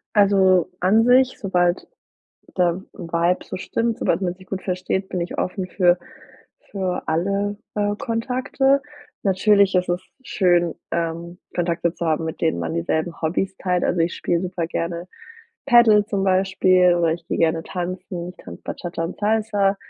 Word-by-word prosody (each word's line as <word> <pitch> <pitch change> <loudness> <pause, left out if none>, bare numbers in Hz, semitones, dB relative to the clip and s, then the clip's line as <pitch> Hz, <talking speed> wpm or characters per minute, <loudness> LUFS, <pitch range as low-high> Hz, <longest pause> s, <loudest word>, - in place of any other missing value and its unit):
Also, 190 -3 +4
an 215 +5 +4
sich, 255 +1 +4
sobald 180 -2 0 0.7
der 180 0 +1
Vibe 170 0 0
so - - -6
stimmt, 230 +3 -1
sobald 170 +3 0
man 180 -1 -1
sich 185 0 -17
gut 190 0 -5
versteht, 190 +1 -2
bin 180 - -2
ich 170 - -4
offen 185 0 -2
für 175 -1 +3 0.7
für 190 -2 -2
alle, 200 +5 0 0.2
äh, 205 0 0
Kontakte. 260 +3 0 0.4
Natürlich 200 0 +3
ist 180 0 +2
es 175 +1 0 0.2
schön, 175 - +2 0.2
ähm, 170 +1 -3 0.2
Kontakte 170 -1 0
zu 170 - -3
haben, 160 +1 0
mit 160 - -5
denen 160 - +1
man 80 -1 -3
dieselben 155 - -2
Hobbys 185 +4 -1
teilt. 180 -1 0
Also, 180 - 0
ich 165 +1 +1
spiele 170 -1 -1
super 180 -2 -3
gerne 170 +1 -3 0.6
Paddle 225 -5 +6
zum 195 -3 -1
Beispiel 185 -1 +3
oder 170 -2 +2
ich 170 - -7
gehe - - -2
gerne 165 0 +2
tanzen, 180 0 -5
ich - - -16
kann - - -10
Bachata 170 -1 -5
und 165 - -6
Salsa, 210 -2 +1
185 Hz, 160 wpm, -22 LUFS, 170-200 Hz, 0.7 s, Paddle